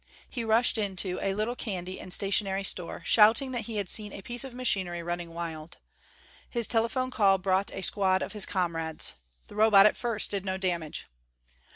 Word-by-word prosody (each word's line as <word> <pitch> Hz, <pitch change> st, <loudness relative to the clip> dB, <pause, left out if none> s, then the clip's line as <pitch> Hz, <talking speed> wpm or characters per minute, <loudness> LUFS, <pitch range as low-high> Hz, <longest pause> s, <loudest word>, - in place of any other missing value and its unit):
He 240 Hz, -, -5 dB
rushed 225 Hz, +1 st, +3 dB
into 190 Hz, -3 st, -2 dB
a 195 Hz, -1 st, -1 dB
little 215 Hz, +4 st, -2 dB
candy 185 Hz, -6 st, -5 dB
and 185 Hz, -, -9 dB
stationery 195 Hz, 0 st, +1 dB
store 180 Hz, -2 st, -1 dB
shouting 225 Hz, +5 st, +4 dB
that 240 Hz, -4 st, -3 dB
he 225 Hz, -, -6 dB
had 200 Hz, -2 st, -2 dB
seen 210 Hz, +1 st, -1 dB
a 195 Hz, -, -9 dB
piece 240 Hz, +3 st, 0 dB
of 270 Hz, -, -7 dB
machinery 190 Hz, -9 st, 0 dB
running 175 Hz, 0 st, -4 dB
wild. 165 Hz, -1 st, -7 dB, 0.7 s
His 235 Hz, -2 st, -2 dB
telephone 245 Hz, +3 st, 0 dB
call 200 Hz, -5 st, +3 dB
brought 190 Hz, +1 st, 0 dB
a 190 Hz, -, -6 dB
squad 190 Hz, 0 st, +2 dB
of -, -, -6 dB
his 210 Hz, -3 st, +2 dB
comrades. 165 Hz, -4 st, -1 dB, 0.3 s
The -, -, -13 dB
Robot 210 Hz, -2 st, +6 dB
at 215 Hz, -, +4 dB
first 230 Hz, -3 st, -1 dB
did 200 Hz, -2 st, -1 dB
no 190 Hz, -1 st, -2 dB
damage. 175 Hz, -5 st, -3 dB
195 Hz, 185 wpm, -28 LUFS, 180-225 Hz, 0.7 s, Robot